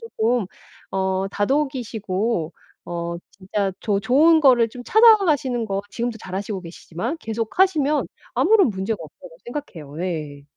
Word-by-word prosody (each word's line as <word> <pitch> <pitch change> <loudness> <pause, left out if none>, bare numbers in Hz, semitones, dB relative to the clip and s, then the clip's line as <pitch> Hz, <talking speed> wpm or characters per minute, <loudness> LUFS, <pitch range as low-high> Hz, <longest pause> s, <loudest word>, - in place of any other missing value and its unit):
쪼끔 240 - -1 0.5
어 190 0 0
다독이시고 220 - -1 0.3
어 170 0 -4 0.2
진짜 195 0 -2
좋 205 -2 0
좋은 295 +10 +5
거를 250 -5 +5
좀 245 +2 -10
찾아가시는 335 - +4
거 195 -1 -2
지금도 235 +1 -3
잘 185 -2 -6
하시고 200 0 -4
계시지만 180 - -5
계속하시면 290 - +1 0.3
아무런 370 - +4
문제가 200 +1 -2
없다고 165 +2 -13
생각해요. 170 - -7
예. 150 -5 -5
220 Hz, 300 characters per minute, -22 LUFS, 190-270 Hz, 0.5 s, 좋은